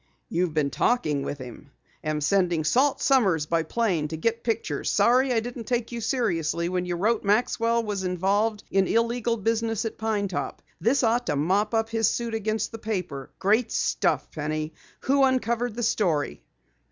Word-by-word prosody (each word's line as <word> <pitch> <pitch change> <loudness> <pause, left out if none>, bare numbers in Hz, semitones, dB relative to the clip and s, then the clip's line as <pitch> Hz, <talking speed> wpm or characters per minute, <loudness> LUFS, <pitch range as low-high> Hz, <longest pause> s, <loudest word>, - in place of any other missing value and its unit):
"YOU'VE 170 -2 -1
BEEN 150 -2 +2
TALKING 155 - +1
WITH 145 - -4
HIM. 130 +2 -10 0.3
AM 155 -1 -1
SENDING 175 -1 +2
SALT 260 - +2
SOMMERS 195 - +3
BY 165 +2 +1
PLANE 170 -3 0
TO 160 +1 -5
GET 230 +7 -1
PICTURES. 225 -2 -1
SORRY 255 +2 +3
I 235 - +3
DIDN'T 240 0 -6
TAKE 240 -2 -1
YOU 235 -1 -4
SERIOUSLY 170 - 0
WHEN 180 0 -2
YOU 175 - -1
WROTE 215 +6 +1
MAXWELL 230 +2 +2
WAS 205 -3 -3
INVOLVED 200 +4 0
IN 195 -1 +3
ILLEGAL 235 0 +1
BUSINESS 225 +1 -1
AT 225 - -5
PINE 215 -2 0
TOP. 185 - -4 0.2
THIS 255 +4 +2
OUGHT 240 +2 +2
TO 150 - +1
MOP 195 +9 +1
UP 225 0 +1
HIS 225 -2 +2
SUIT 235 -1 -3
AGAINST 215 0 -1
THE 225 - -7
PAPER. 180 -11 -4
GREAT 215 +5 +2
STUFF, - - 0
PENNY! 155 +1 -3 0.3
WHO 275 +1 +3
UNCOVERED 245 -3 +1
THE 240 - -3
STORY?" 165 - 0
215 Hz, 175 wpm, -26 LUFS, 170-235 Hz, 0.3 s, SOMMERS